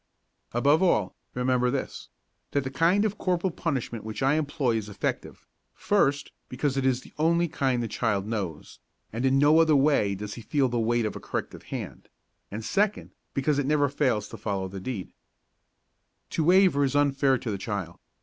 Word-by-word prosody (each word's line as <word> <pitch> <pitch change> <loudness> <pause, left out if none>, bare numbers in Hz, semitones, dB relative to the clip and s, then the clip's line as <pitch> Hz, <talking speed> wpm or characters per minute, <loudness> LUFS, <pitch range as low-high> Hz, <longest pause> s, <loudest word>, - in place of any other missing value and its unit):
Above 140 +7 +3
all, 110 - +2 0.2
remember 125 0 +1
this: 135 +1 -4 0.4
That 140 - +1
the 130 - -5
kind 175 +9 +3
of 210 -1 -2
corporal 180 0 0
punishment 130 -9 -3
which 110 +4 -5
I 135 +2 +4
employ 145 -6 0
is 105 -1 -5
effective, 100 -1 -4 0.3
first 145 -9 +1 0.2
because 135 +2 -1
it 135 -1 +1
is 130 -1 +1
the - - -16
only 170 +2 +3
kind 135 -6 0
the - - -2
child 105 -3 -1
knows, 100 -8 -5 0.3
and 120 +4 0
in 135 +1 +3
no 150 +3 +5
other 160 -2 +5
way 135 -8 +3
does 105 +1 -6
he 120 - -8
feel 135 +2 +1
the 120 0 -1
weight 115 0 +1
of 105 - -3
a - - -5
corrective - - -5
hand; - - -7 0.4
and 110 +2 -6
second, 205 - 0 0.2
because 145 +1 +1
it 140 - -1
never 145 -1 +2
fails 125 -7 0
to - - -9
follow 100 -3 -3
the 95 +1 -7
deed. 105 -3 -5 1.2
To 160 - 0
waver 180 -5 +5
is 140 0 0
unfair 140 -2 +3
to 120 -3 -4
the 100 - -3
child. 95 -5 -4
130 Hz, 185 wpm, -27 LUFS, 110-150 Hz, 1.2 s, no